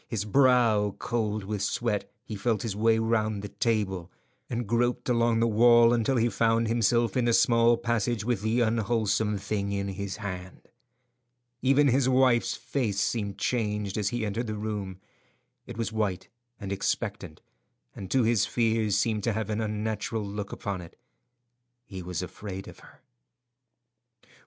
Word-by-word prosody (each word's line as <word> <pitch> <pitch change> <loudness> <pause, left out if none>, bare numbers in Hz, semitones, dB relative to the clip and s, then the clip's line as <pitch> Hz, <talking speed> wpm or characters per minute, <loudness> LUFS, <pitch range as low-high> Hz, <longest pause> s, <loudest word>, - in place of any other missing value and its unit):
His 105 -3 -3
brow 115 -4 +3
cold 110 -3 -2
with 105 0 -4
sweat, 110 -2 -1
he 110 - -7
felt 110 0 -1
his 110 -4 -3
way 110 +1 +3
round 110 -2 0
the 105 - -5
table, 95 -7 -1 0.4
and 120 0 -2
groped 120 +2 0
along 115 -1 +2
the 115 - +3
wall 120 +1 +6
until 120 +3 +1
he 115 0 +3
found 115 0 +1
himself 115 -1 +2
in 125 - +1
the 120 - +2
small 115 0 +4
passage 115 -2 -1
with 120 -5 0
the 110 +3 +1
unwholesome 110 -2 +1
thing 100 0 -3
in 100 0 -2
his 100 0 -5
hand. 95 -3 -7 1.0
Even 140 +2 +4
his 130 +1 +2
wife's 130 -2 +3
face 110 -8 -2
seemed 100 -2 -1
changed 105 -3 -1
as 105 -2 0
he 120 -1 -2
entered 110 +3 -3
the 110 - -3
room. 105 -3 -4 0.7
It - - -8
was 115 -1 -3
white 100 -4 -2 0.3
and 100 -3 -6
expectant, 100 -4 -3 0.6
and 95 - -8
to 130 +2 +2
his 110 -2 +2
fears 110 -3 +1
seemed 105 0 0
to 115 - +1
have 110 0 -3
an 105 +1 -1
unnatural 110 0 -3
look 100 0 -5
upon 100 -3 -4
it. 85 - -13 0.9
He 95 -2 -8
was 90 0 -4
afraid 95 +1 -7
of - - -12
her. - - -18
110 Hz, 160 wpm, -27 LUFS, 100-115 Hz, 1.0 s, wall